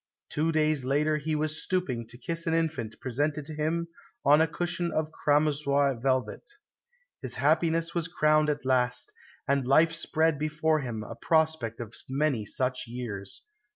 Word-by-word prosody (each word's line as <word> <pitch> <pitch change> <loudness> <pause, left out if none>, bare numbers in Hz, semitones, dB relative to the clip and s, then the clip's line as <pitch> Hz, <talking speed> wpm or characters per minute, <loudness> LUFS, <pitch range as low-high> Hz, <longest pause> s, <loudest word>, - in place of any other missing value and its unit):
Two 160 +2 0
days 155 -3 +2
later 150 +4 +1
he 155 +1 -2
was 155 +1 -1
stooping 130 -12 -1
to 120 +1 -10
kiss 165 +7 -3
an 165 - +2
infant 150 -10 -2
presented 145 +4 -1
to 155 - -8
him 160 +3 -1 0.4
on 150 +2 +6
a 160 - +4
cushion 175 +2 -2
of 155 0 -1
cramoisi 145 -4 +1
velvet. 130 - -1 0.7
His - - -5
happiness 165 0 +2
was 170 -1 -1
crowned 155 -2 +3
at 145 -2 -2
last, 125 -1 +1 0.3
and 140 -2 +1
life 160 +5 +5
spread 160 -1 +1
before 155 +1 +1
him 120 -6 -4
a 105 - -7
prospect 155 -3 +1
of 115 -2 -7 0.2
many 135 -6 0
such 125 +2 -1
years. 115 -5 -6
150 Hz, 155 wpm, -28 LUFS, 130-160 Hz, 0.7 s, on